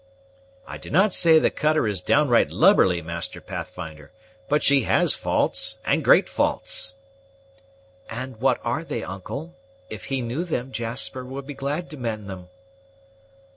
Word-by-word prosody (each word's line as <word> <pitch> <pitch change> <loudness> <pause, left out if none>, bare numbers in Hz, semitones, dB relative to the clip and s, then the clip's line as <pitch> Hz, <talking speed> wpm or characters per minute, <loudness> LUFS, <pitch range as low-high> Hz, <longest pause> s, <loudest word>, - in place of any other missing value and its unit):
"I - - -8
do - - -9
not 190 +5 +3
say 165 -2 +6
that 160 - +6
the - - +2
cutter 155 -3 +1
is 100 -4 -2
downright 140 +1 +3
lubberly, 85 -3 +4
Master 85 +1 -3
Pathfinder; 80 -5 -8 0.4
but 150 +1 +2
she 140 -1 +5
has - - +4
faults, - - 0
and - - +1
great - - +5
faults." 110 - -1 1.1
"And 130 +1 -6
what 130 +4 +2
are 120 +7 -1
they, 120 -8 -4
uncle? 135 - -7 0.4
If 110 - -7
he 135 -2 -2
knew 125 +8 -2
them, 135 -7 -3
Jasper 120 +2 -3
would 135 +2 -7
be 145 - -7
glad 140 +5 -3
to 150 - -8
mend 110 -5 -4
them." 90 -2 -9
125 Hz, 155 wpm, -24 LUFS, 105-150 Hz, 1.1 s, say